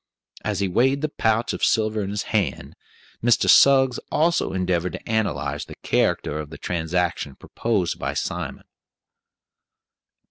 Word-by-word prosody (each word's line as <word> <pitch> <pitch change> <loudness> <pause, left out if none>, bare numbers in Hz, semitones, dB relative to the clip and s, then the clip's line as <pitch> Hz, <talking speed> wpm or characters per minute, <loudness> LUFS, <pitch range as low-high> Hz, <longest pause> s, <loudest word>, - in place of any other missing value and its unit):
As 100 -2 -2
he 100 - +1
weighed 135 +9 +2
the 155 - +1
pouch 110 +1 +1
of - - -5
silver 110 -1 +2
in 100 - -3
his 100 0 -2
hand, 95 -11 -1 0.5
Mr. 120 0 +3
Suggs 130 -2 +6
also 165 +3 +1
endeavored 90 -2 -1
to 90 - -8
analyze 105 -11 -1
the - - -11
character 75 - 0
of 75 -1 -6
the 80 - -9
transaction 85 -4 -2
proposed 105 -7 -2
by - - -3
Simon. - - -4
100 Hz, 140 wpm, -23 LUFS, 90-115 Hz, 0.5 s, Suggs